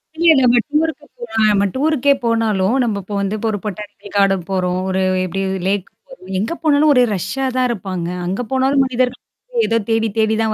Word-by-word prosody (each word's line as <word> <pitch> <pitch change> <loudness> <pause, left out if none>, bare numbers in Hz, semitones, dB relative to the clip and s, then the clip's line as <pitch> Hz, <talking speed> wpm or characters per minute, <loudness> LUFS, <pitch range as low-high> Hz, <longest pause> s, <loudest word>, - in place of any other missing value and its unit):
இல்ல 335 +1 +3
நம்ம 245 -1 +4
டூர்ருக்கு 305 0 -1
போனாலும் 220 -2 +1
நம்ம 200 0 +2
டூர்ருக்கே 285 -1 +2
போனாலும், 225 -2 +1
நம்ம 210 -4 -1
இப்போ 205 +2 -6
வந்து 200 +2 -1
இப்ப 225 - -3
ஒரு 205 - -3
பொட்டானிக்கல் 205 0 -8
கார்டன் 195 -3 +2
போறோம். 180 -1 0
ஒரு 190 0 0 0.2
எப்பிடி 195 +2 -3 0.3
லேக் 195 -1 0 0.2
போறோம். - - -12
எங்க 225 +11 -2
போனாலும் 300 0 +4
ஒரே 250 -1 +5
ரஷ்ஷா 195 +10 -3
தான் 255 -1 +2
இருப்பாங்க. 185 -6 -4 0.2
அங்க 190 +7 -2
போனாலும் 265 +1 +2
மனிதர்கள் 250 0 -1 0.4
ஏதோ 230 - +1
தேடி, 225 0 +2
தேடி 220 0 +2
தான் 220 -1 0
225 Hz, 180 wpm, -18 LUFS, 195-260 Hz, 0.4 s, ஒரே